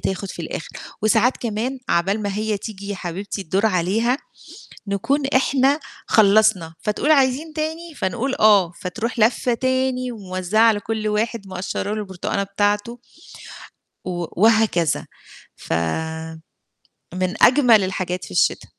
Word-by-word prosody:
تاخُد 190 0 -3
في 170 - -7
الآخِر، 160 - -6 0.3
وساعات 225 +3 +3
كمان 235 +4 -3
عَقبال 195 +5 +1
ما 200 -1 -2
هي 215 0 -1
تيجي 200 -1 -8
يا 205 - -2
حبيبتي 190 +4 -5
الدور 190 +5 +1
عليها، 215 +6 +1 0.7
نكون 270 +9 0
إحنا 270 +2 +3 0.3
خلّصنا، 205 -5 +4
فتقول: 215 +8 0
"عايزين 285 +2 +2
تاني؟" 320 +1 -4
فنقول: 245 +8 -2
"آه." 205 -5 +5
فتروح 225 +6 -4
لفّة 240 +2 +2
تاني، 260 0 0
وموزّعة 190 -1 -1
على 225 -2 +5
كلّ 215 +1 -3
واحد 215 0 -1
مقشّر 185 0 -4
له - - -3
البرتقانة 190 0 -3
بتاعته، 205 +4 -1 1.1
و 175 -1 -3 0.2
وهكذا. 220 -9 +3 0.5
فمن 160 - -4 0.9
أجمّل 240 -6 +6
الحاجات 185 -1 -3
في - - -11
الشتا. 90 - +1
210 Hz, 125 wpm, -21 LUFS, 185-245 Hz, 1.1 s, أجمّل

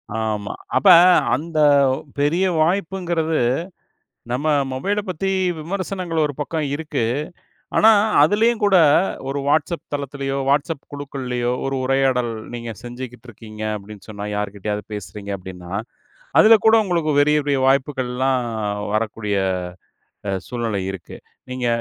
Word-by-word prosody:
ஆமா. 110 -2 -2 0.3
அப்ப - - +2 0.5
அந்தப் 145 -2 +3 0.3
பெரிய 155 +6 +2 0.2
வாய்ப்புங்கறது 170 -2 0 0.9
நம்ம 135 +5 -2 0.3
மொபைலப் 200 +11 -2
பத்தி 195 +3 -2 0.3
விமர்சனங்கள் 180 -1 -3
ஒரு 145 - -1
பக்கம் 155 +1 -2
இருக்கு. 150 -5 -2 0.7
ஆனா 220 - +7 0.3
அதுலயும் 215 +8 +3
கூட 200 -2 +4 0.5
ஒரு 140 +1 -2
WhatsApp 160 +4 +1
தளத்துலயோ, 140 -1 -3
WhatsApp 145 +1 0
குழுக்கள்லயோ 130 -4 -3
ஒரு 135 0 -1
உரையாடல் 130 -2 +1 0.2
நீங்க 120 -1 -5
செஞ்சுகிட்ருக்கீங்க 120 -3 -9
அப்டின்னு 105 0 -11
சொன்னா 105 -1 -6
யாருகிட்டயாவது 105 0 -3
பேசுறீங்க 100 0 -7
அப்டின்னா, 90 -2 -10 0.7
அதுல 225 +1 +8
கூட 220 0 +7
உங்களுக்குப் 165 -6 +1
பெரிய 150 +1 +3
பெரிய 140 -2 +1
வாய்ப்புகள்லாம் 130 -1 +1 0.5
வரக்கூடிய 110 -1 -1 0.9
அ - - +1 0.2
சூழ்நிலை 115 -5 -2
இருக்கு. 95 -3 -9 0.3
நீங்க 125 -1 -3
135 Hz, 110 wpm, -21 LUFS, 115-160 Hz, 0.9 s, அதுல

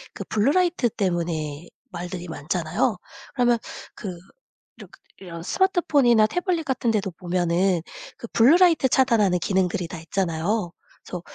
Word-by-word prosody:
그 - - -5
블루 220 +6 +2
라이트 350 -9 +2
때문에 170 -5 -3 0.2
말들이 175 0 -6
많잖아요. 170 - -1 0.4
그러면 240 -2 +3 0.4
그 185 -4 -6 0.6
이러 - - -11 0.3
이런 170 -3 -9
스마트폰이나 285 - +3
태블릿 355 - -1
같은 255 -3 -1
데도 200 -3 -1
보면은 175 0 0 0.4
그 235 - -8
블루 265 +10 +6
라이트 335 -8 +4
차단하는 225 -9 +3
기능들이 180 -1 0
다 170 -1 -8
있잖아요. 175 +3 -2 0.3
그래서 180 -2 -6
195 Hz, 330 characters per minute, -24 LUFS, 175-245 Hz, 0.6 s, 블루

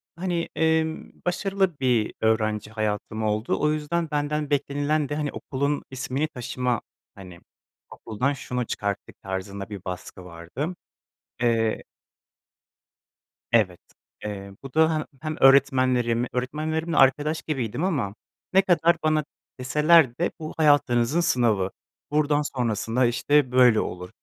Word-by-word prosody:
hani, 175 -1 -2
emm, 160 0 0
başarılı 190 -2 0
bir 125 -5 +1
öğrenci 110 -1 +1
hayatım 110 0 -2
oldu. 110 +1 0
O 150 - +2
yüzden 155 +2 -2
benden 150 0 -1
beklenilen 145 +1 0
de 145 - -2
hani 150 -1 -2
okulun 140 +2 -2
ismini 130 +3 -2
taşıma, 125 -3 -2 0.3
hani 90 -3 -11 0.5
okuldan 125 +6 -2
şunu 125 -2 -3
çıkarttık 100 -2 -4
tarzında 95 +1 -5
bir 100 -3 -8
baskı 90 0 -7
vardı. 90 - -5 0.7
Eee 115 -2 +1 1.7
Evet, 105 -7 +2 0.5
eee, 100 -1 -6
bu 135 -1 -9
da 160 0 +4
he 155 - -4 0.2
hem 155 -1 -3
öğretmenlerim, 130 -3 +4
öğretmenlerimle 155 +6 -2
arkadaş 145 +4 +3
gibiydim 135 -1 -3
ama 140 - -1 0.4
ne 190 - +7
kadar 170 -3 +3
bana 155 -1 +2 0.4
deseler 150 0 +4
de 175 - 0
bu 155 -1 -6
hayatınızın 145 -2 +3
sınavı, 115 - +2 0.4
buradan 150 0 +2
sonrasında 125 -3 0
işte 125 +3 +2
böyle 125 -3 +6
olur, 90 0 -4
130 Hz, 120 wpm, -25 LUFS, 110-155 Hz, 1.7 s, ne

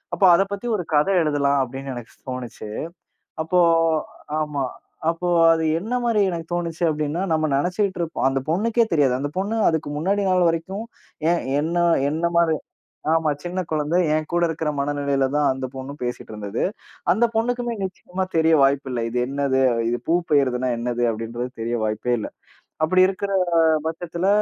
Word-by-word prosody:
அப்போ 200 - +1
அதப் 195 +3 +2
பத்தி 200 +4 -4
ஒரு 180 - -4
கதை 150 +6 +3
எழுதலாம் 140 -2 +2
அப்டின்னு 135 +1 -5
எனக்குத் 120 -1 -11
தோணுச்சு. 125 -4 -6 0.8
அப்போ 180 +3 +1 0.8
ஆமா. 150 -2 -2 0.5
அப்போ 170 +2 -2 0.3
அது 160 - -1 0.2
என்ன 225 +7 -3
மாரி 230 -3 +2
எனக்குத் 170 -1 -5
தோணுச்சு 170 -1 -2
அப்டின்னா, 155 +2 -1
நம்ம 155 0 +1
நெனைச்சுக்கிட்டு 180 +6 0
இருப்போம் 165 -4 -2
அந்தப் 135 0 -1
பொண்ணுக்கே 225 +7 +2
தெரியாது. 140 -5 +3
அந்தப் 145 +4 -4
பொண்ணு 200 +4 -1
அதுக்கு 160 -3 -2
முன்னாடி 195 +6 +1
நாள் 180 -1 +4
வரைக்கும் 185 +6 -3 0.5
ஏன் 175 - 0 0.2
என்ன 165 +3 -1 0.3
என்ன 160 +3 -1
மாரி 165 -2 +3 0.6
ஆமா 160 -1 +2
சின்னக் 180 0 -4
குழந்தை 155 +2 +1 0.2
ஏன் 155 0 -1
கூட 175 0 +1
இருக்கிற 160 -1 -2
மனநிலையில 140 -1 0
தான் 150 -1 +3
அந்தப் 130 -1 -6
பொண்ணும் 135 +2 -7
பேசிட்டு 120 -2 -5
இருந்தது. 105 0 -3 0.5
அந்தப் 230 +3 +1
பொண்ணுக்குமே 240 +1 0
நிச்சியமா 185 0 -4
தெரிய 160 0 +4
வாய்ப்பு 135 0 +2
இல்ல. 120 -2 -2
இது 120 - -3
என்னது? 135 -1 0 0.3
இது 120 +1 -1
பூப்பெய்யிர்துன்னா 140 -7 +2
என்னது? 120 +1 -2
அப்டின்றது 115 +3 -4
தெரிய 120 +1 -1
வாய்ப்பே 110 +3 -1
இல்ல. - - -5 0.6
அப்டி 185 +3 +3
இருக்குற 200 +1 -3 0.6
பட்சத்துல 170 +2 -3
155 Hz, 155 wpm, -23 LUFS, 135-180 Hz, 0.8 s, நாள்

